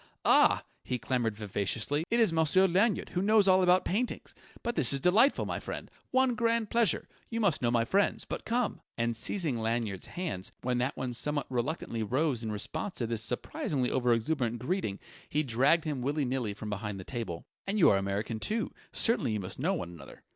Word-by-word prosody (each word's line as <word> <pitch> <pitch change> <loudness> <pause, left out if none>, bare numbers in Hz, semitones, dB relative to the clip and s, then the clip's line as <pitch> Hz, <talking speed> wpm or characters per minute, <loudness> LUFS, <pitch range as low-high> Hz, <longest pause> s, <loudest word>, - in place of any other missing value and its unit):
Ah!" - - +5 0.2
he 125 - -2
clamoured 120 -3 -1
vivaciously. 110 - -1
"It 235 - +2
is 220 -7 +4
Monsieur 165 +4 +4
Lanyard, 195 +4 +2
who 180 - -1
knows 210 0 +4
all 190 0 +6
about 180 0 +4
paintings! 235 +7 -2 0.3
But 240 -1 -2
this 140 - +2
is 140 - 0
delightful, 210 - +4
my - - -3
friend - - -7 0.2
one 260 -1 +3
grand 230 -2 +1
pleasure! 230 -8 +2 0.2
You 230 - -3
must 200 -9 +2
know 120 - +2
my 115 -1 +2
friends.... 200 +10 +1
But - - -5
come!" 235 -1 -1 0.2
And 115 0 0
seizing 145 - 0
Lanyard's 110 -4 -2
hands, 160 - -4
when 125 -1 0
that 130 +4 -1
one 130 -2 -3
somewhat 145 +4 -1
reluctantly 125 -2 -2
rose 130 +3 0
in 110 -2 -3
response 155 - -4
to 120 - -1
this 115 -1 -1
surprisingly 125 +2 -2
over 125 -2 +2
exuberant 120 0 0
greeting, 125 - -2 0.3
he 150 +1 +1
dragged 135 +6 +3
him 145 -5 -3
willy 145 +3 0
nilly 125 -5 -2
from 105 0 -6
behind 105 0 -4
his 95 - -8
table. 110 -10 -5 0.2
"And 200 +2 0
you 185 - +6
are 100 - +4
American, 100 +3 -2
too. 220 - -1 0.2
Certainly 225 - +3
you 105 - -1
must 95 +3 -7
know 180 +8 +1
one 125 - -4
another. 85 -6 -12
135 Hz, 195 wpm, -30 LUFS, 115-185 Hz, 0.3 s, all